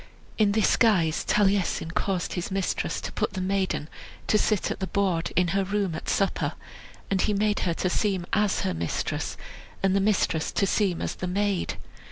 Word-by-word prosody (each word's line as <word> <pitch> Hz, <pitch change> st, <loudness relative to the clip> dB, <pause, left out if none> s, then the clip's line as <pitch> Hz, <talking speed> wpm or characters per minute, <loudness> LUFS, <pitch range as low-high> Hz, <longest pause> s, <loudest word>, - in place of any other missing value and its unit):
In 205 Hz, -2 st, +4 dB
this 215 Hz, -1 st, +3 dB
guise 175 Hz, -9 st, +3 dB
Taliesin 195 Hz, -5 st, +1 dB
caused 185 Hz, 0 st, -1 dB
his 175 Hz, -, -3 dB
mistress 195 Hz, -1 st, -1 dB
to -, -, -5 dB
put -, -, -2 dB
the 190 Hz, -, -3 dB
maiden 190 Hz, -4 st, -1 dB, 0.4 s
to 215 Hz, -, +3 dB
sit 210 Hz, -3 st, +1 dB
at -, -, -4 dB
the 190 Hz, -, -2 dB
board 185 Hz, -5 st, 0 dB
in 180 Hz, -1 st, +3 dB
her 195 Hz, +3 st, +1 dB
room 195 Hz, -2 st, -1 dB
at 160 Hz, -, -5 dB
supper; 195 Hz, -, 0 dB, 0.6 s
and 190 Hz, -1 st, +2 dB
he 210 Hz, -, +1 dB
made 210 Hz, +1 st, +1 dB
her 165 Hz, -, 0 dB
to 185 Hz, -, -1 dB
seem 190 Hz, -1 st, 0 dB
as 210 Hz, -1 st, +2 dB
her 95 Hz, -, -1 dB
mistress, 85 Hz, 0 st, -2 dB, 0.5 s
and 195 Hz, 0 st, +3 dB
the -, -, +4 dB
mistress 195 Hz, -6 st, +1 dB
to 200 Hz, -, +2 dB
seem 195 Hz, -3 st, +1 dB
as -, -, -2 dB
the 185 Hz, -, -5 dB
maid. 195 Hz, 0 st, 0 dB
195 Hz, 190 wpm, -26 LUFS, 180-205 Hz, 0.6 s, In